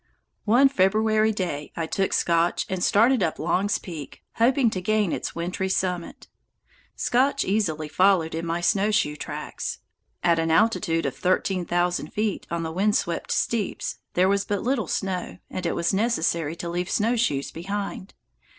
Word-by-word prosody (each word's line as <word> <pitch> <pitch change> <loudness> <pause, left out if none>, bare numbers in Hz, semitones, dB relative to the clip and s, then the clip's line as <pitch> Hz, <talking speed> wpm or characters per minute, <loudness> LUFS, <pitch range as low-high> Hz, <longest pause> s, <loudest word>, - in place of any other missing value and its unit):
One 245 +6 +6
February 215 -1 +2
day 175 -8 -3
I 165 - -2
took 195 +4 -1
Scotch 170 0 +1
and 185 -1 -2
started 230 +3 +4
up 165 -3 0
Long's 190 +5 +1
Peak, 160 -6 -9
hoping 240 0 +3
to 185 - -3
gain 210 -1 +1
its - - -4
wintry 180 +3 -2
summit. 180 -2 -2 0.7
Scotch 270 +3 +1
easily 170 -7 0
followed 180 0 +3
in 165 +1 -3
my 170 +1 -2
snowshoe 200 -4 +2
tracks. 145 - -5 0.5
At 170 -1 +3
an 165 0 0
altitude 170 -2 +2
of - - -2
thirteen 185 0 0
thousand 175 0 0
feet 210 -2 -2
on 170 0 -2
the 160 - -3
wind 200 +5 +1
swept 170 -1 -2
steeps 225 -4 -1 0.2
there 180 +1 +4
was 200 0 +2
but 205 -1 -2
little 245 -6 0
snow, 185 0 -3
and 185 -2 -3
it - - -1
was 170 +2 0
necessary 170 -7 0
to 170 - -6
leave 175 +1 -2
snowshoes 220 - 0
behind. 195 +2 -5
185 Hz, 160 wpm, -25 LUFS, 170-215 Hz, 0.7 s, One